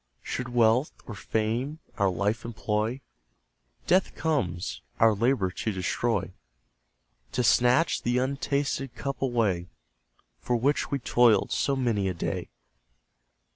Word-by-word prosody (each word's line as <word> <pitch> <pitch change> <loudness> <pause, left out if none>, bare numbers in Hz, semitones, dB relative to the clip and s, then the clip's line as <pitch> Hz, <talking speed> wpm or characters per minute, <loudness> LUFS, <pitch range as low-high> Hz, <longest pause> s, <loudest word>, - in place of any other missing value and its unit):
Should 125 -1 -4
Wealth, 120 +3 +3
or 120 - -7
Fame, 115 +8 -2 0.2
our 100 -1 +3
Life 105 +5 -1
employ, 110 +2 -2 0.8
Death 185 +1 +2
comes, 100 - -2 0.2
our 115 -1 +6
labour 105 -3 +1
to 110 - -3
destroy; 95 0 -1 1.0
To 125 - +1
snatch 125 +7 +3
the 120 +1 0
untasted 135 0 -1
cup 135 -1 -4
away, 110 -9 0 0.7
For 125 - -1
which 135 +5 +1
we 140 - 0
toiled 120 -3 +3
so 140 - +1
many 115 -7 0
a 90 - -3
day. - - -3
120 Hz, 120 wpm, -27 LUFS, 105-135 Hz, 1.0 s, our